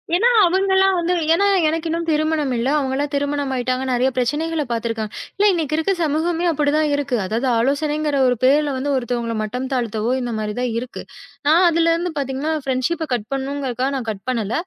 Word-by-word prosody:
ஏன்னா 430 +7 +3 0.2
அவங்கல்லாம் 385 +1 +3
வந்து, 345 +1 0 0.2
ஏன்னா 400 +4 +2 0.2
எனக்கு 325 +1 -1
இன்னும் 335 +1 -2
திருமணம் 310 -2 +1
இல்ல. 235 +2 -1
அவங்க 265 -2 -2
எல்லாம் 290 +1 -1
திருமணம் 285 0 -1
ஆயிட்டாங்க. 255 +1 -1
நெறைய 250 +1 +2
பிரச்சனைகள 300 +5 0
பாத்துருக்காங்க. 225 -2 -2 0.2
இல்ல, 410 - +2
இன்னைக்கு 315 -4 -2
இருக்குற 320 +5 +1
சமூகமே 325 +3 0
அப்டித்தான் 300 0 +1
இருக்கு. 280 -3 -1
அதாவது, 230 +7 -1
ஆலோசனைங்கிற 295 +3 0
ஒரு 250 - +2
பேர்ல 290 +2 +4
வந்து 280 +2 -2
ஒருத்தவங்கள 240 -2 -2
மட்டம் 250 +5 -4
தாழ்த்தவோ, 230 -1 -1
இந்த 245 - -3
மாரி 210 -1 -3
தான் 250 - 0
இருக்கு. 250 +1 -5 0.5
நான் 335 +4 +5
அதுல 335 0 +2
இருந்து 345 +1 -2
பாத்தீங்கன்னா 275 +3 -2
ஃபிரண்ட்ஷிப் 265 +6 -1
கட் 225 -3 -2
பண்ணனும்ங்கறதுக்காக 270 -1 -2
நான் 250 -4 -4
கட் 195 -2 -9
பண்ணல. 230 -4 -1
280 Hz, 175 wpm, -20 LUFS, 250-320 Hz, 0.5 s, நான்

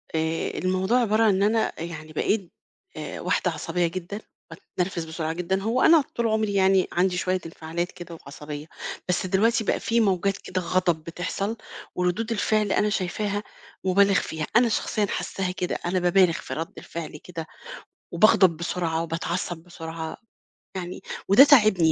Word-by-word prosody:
آآ 160 +1 -1
الموضوع 185 +5 +1
عبارة 220 -1 +2
عن 210 -3 +4
إن 195 - +1
أنا 220 +2 +3
أ 190 - -2
يعني 155 -2 -7
بقيت 195 +2 0 0.5
آآ - - -6
واحدة - - +1
عصبية 175 +1 -1
جدًا، 185 +4 -5 0.3
باتنرفز 180 -2 -4
بسرعة 160 0 -3
جدًا 180 +3 -1
هو 230 +5 0
أنا 325 -1 +7
طول 235 -1 +1
عُمري 215 -1 0
يعني 190 -1 +4
عَندي 180 +1 +1
شوية 185 +1 0
انفعالات 165 +2 -4
كده 175 -1 -9
وعصبية، 150 0 -8 0.4
بس 180 - +1
دلوقتي 220 +5 +2
بقى - - 0
في 230 +1 +1
موجات 195 -2 +2
كده 185 0 -4
غضب 175 -2 +1
بتحصَل 185 +6 -3 0.4
وردود 180 +6 0
الفعل 215 -1 +1
أنا 210 - +2
شايفاها 205 +1 -2 0.4
مُبالغ 200 +2 +4
فيها، 160 -4 -1
أنا 235 0 +5
شخصيًا 215 -1 0
حاسّاها 190 -1 -3
كده، 180 -1 -2
أنا 180 +1 +1
بابالغ 180 0 +4
في - - -6
رَد 165 +1 -4
الفعل 165 -2 -7
كده 165 -3 -6 0.7
وباغضب، 190 -2 +5
بسرعة 165 -1 -1
وباتعصّب 170 +2 -3
بسرعة. 165 -2 -7 0.6
يعني، 180 0 -6 0.3
وده 200 +8 +9
تاعبني 215 - +5
185 Hz, 155 wpm, -25 LUFS, 165-205 Hz, 0.7 s, وده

